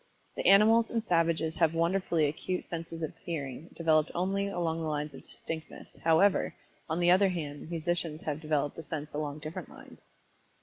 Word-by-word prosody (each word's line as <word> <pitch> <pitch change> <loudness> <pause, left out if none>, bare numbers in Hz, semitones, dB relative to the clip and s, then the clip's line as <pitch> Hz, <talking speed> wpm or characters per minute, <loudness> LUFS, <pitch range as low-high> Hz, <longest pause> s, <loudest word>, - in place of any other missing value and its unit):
The - - -1
animals 220 +3 +6
and 230 -2 -1
savages 165 -2 +1
have 165 -2 +3
wonderfully 170 -1 +2
acute 155 +5 -2
senses 165 -1 -6
of 155 - -4
Hearing 150 -2 -5
developed 155 -2 +3
only 195 +3 0
along 165 -4 -1
the 160 - -2
lines 150 -1 -2
of 135 - -10
distinctness, 160 -1 -7
however 165 +5 +4 0.3
on 160 +2 0
the 175 0 +5
other 190 +2 +5
hand 150 -4 -5
musicians 170 -1 -2
have 150 0 -3
developed 150 -2 0
the 165 - -6
sense 155 -1 -5
along 150 0 -3
different 155 +2 -6
lines. - - -14
165 Hz, 170 wpm, -30 LUFS, 155-175 Hz, 0.3 s, animals